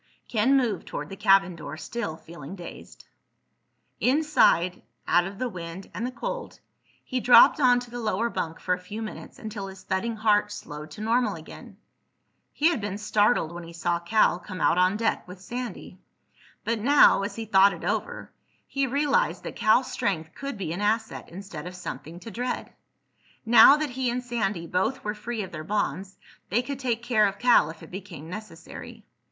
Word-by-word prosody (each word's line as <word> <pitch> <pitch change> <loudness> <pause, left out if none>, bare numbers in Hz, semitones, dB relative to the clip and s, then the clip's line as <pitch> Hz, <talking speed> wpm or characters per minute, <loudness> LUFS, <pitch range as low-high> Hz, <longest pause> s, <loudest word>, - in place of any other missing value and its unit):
Ken 245 +5 +3
moved 230 -8 -1
toward 150 +1 -5
the 195 - -7
cabin 195 -2 +4
door, 155 -2 -8
still 160 0 -4
feeling 165 +1 -10
dazed. 175 -3 -11 0.9
Inside, 255 - +3 0.3
out 175 0 +3
of 195 +1 -9
the 255 - -1
wind 180 -2 -8
and 235 - -3
the - - -5
cold, - - -5 0.4
he 255 - -2
dropped 245 +4 +7
onto 245 -3 +3
the 245 - -5
lower 220 0 0
bunk 165 -8 -4
for 180 - 0
a 180 - -2
few 205 +4 -8
minutes 215 - -8
until 210 -2 -6
his 190 -1 -11
thudding 210 +4 -1
heart 210 -1 +2
slowed 150 -6 -8
to 155 - -10
normal 225 -1 +1
again. 160 0 -12 0.7
He 310 +3 +3
had 325 -10 -1
been 200 -1 -3
startled 210 -4 +2
when 175 0 -7
he 170 0 -11
saw 170 +1 -1
Cal 175 0 +2
come 185 +1 -8
out 175 - +3
on 185 +3 +3
deck 225 -4 -1
with 180 +1 -10
Sandy, 245 +6 -7 0.6
but 230 0 -1
now—as 210 -5 +5
he 225 - -5
thought 200 -1 +6
it - - -8
over—he 275 -1 -4
realized 295 - +1
that - - -6
Cal's 230 +4 +3
strength 160 -5 -2
could 275 -4 -6
be 170 -5 -3
an 185 - -4
asset 220 +2 -1
instead 180 -3 -8
of 180 - -8
something 165 0 -7
to 230 - -8
dread. 245 +4 -4 0.7
Now 235 +5 +8
that 300 -3 -2
he 255 0 -1
and 245 +1 -2
Sandy 210 -8 -2
both 185 +10 -1
were 210 - -2
free 220 +1 -4
of 190 - -8
their 155 -2 -6
bonds 195 0 -2 0.3
they 240 +4 +1
could 275 +1 -5
take 240 -3 -1
care 220 -4 +3
of 200 0 -4
Cal 240 -10 +5
if 160 - -10
it - - -12
became 175 -4 -8
necessary. 185 -5 -9
210 Hz, 180 wpm, -26 LUFS, 180-240 Hz, 0.9 s, Now